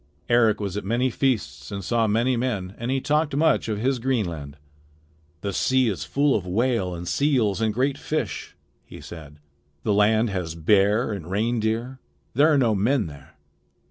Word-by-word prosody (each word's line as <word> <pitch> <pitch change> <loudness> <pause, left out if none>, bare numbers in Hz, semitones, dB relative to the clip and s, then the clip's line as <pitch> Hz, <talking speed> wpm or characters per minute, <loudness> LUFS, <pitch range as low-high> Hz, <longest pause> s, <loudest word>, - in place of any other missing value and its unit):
Eric 115 -3 +4
was 100 -3 -3
at 105 - -3
many 120 +6 0
feasts 110 - -1
and 100 -1 -5
saw 115 +3 +1
many 120 +5 +2
men, 105 -7 -2
and 120 +1 -3
he 135 +1 +1
talked 150 +1 0
much 155 -5 +2
of 105 - -1
his 130 +4 0
Greenland. 85 - -2 0.8
"The 100 -1 -3
sea 130 +4 +2
is 85 -7 -4
full 140 - +2
of 100 - 0
whale 100 -2 0
and 85 +1 -7
seals 115 - +1
and 110 -1 +2
great 135 +5 0
fish," 155 - -3 0.3
he - - -12
said. 75 -3 -11 0.5
"The 105 - +1
land 110 +2 +3
has 90 -4 -3
bear 105 +7 +2
and 90 -5 -7
reindeer. 115 +4 -1 0.3
There 150 +6 +4
are 150 - +4
no 120 -5 +3
men 110 +5 +1
there. 75 -3 -12
110 Hz, 175 wpm, -24 LUFS, 95-130 Hz, 0.8 s, Eric